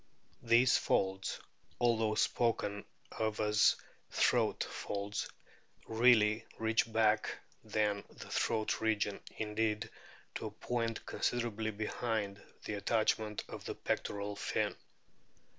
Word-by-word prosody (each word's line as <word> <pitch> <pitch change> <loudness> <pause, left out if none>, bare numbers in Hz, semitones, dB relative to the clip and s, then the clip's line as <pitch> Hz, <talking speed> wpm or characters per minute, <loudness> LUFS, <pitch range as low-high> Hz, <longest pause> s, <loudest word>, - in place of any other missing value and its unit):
These 120 +2 +5
folds, 95 0 0 0.4
although 115 -3 +2
spoken 105 -3 +1 0.3
of 110 -1 -2
as 105 0 +4 0.3
throat - - +2
folds, 100 +1 -3 0.6
really 110 -1 +4
reach 110 0 +3
further 115 - -15
back 110 -1 +3 0.3
than 105 -2 0
the - - -11
throat 110 -1 0
region 105 -2 0 0.2
indeed, 110 0 -1 0.4
to - - -4
a - - -4
point 115 -2 -3
considerably 115 -3 -1
behind 105 -1 -2 0.2
the - - -3
attachment 110 0 0
of - - -8
the - - -4
pectoral 100 0 -2
fin. 100 - -1
110 Hz, 110 wpm, -34 LUFS, 105-115 Hz, 0.6 s, These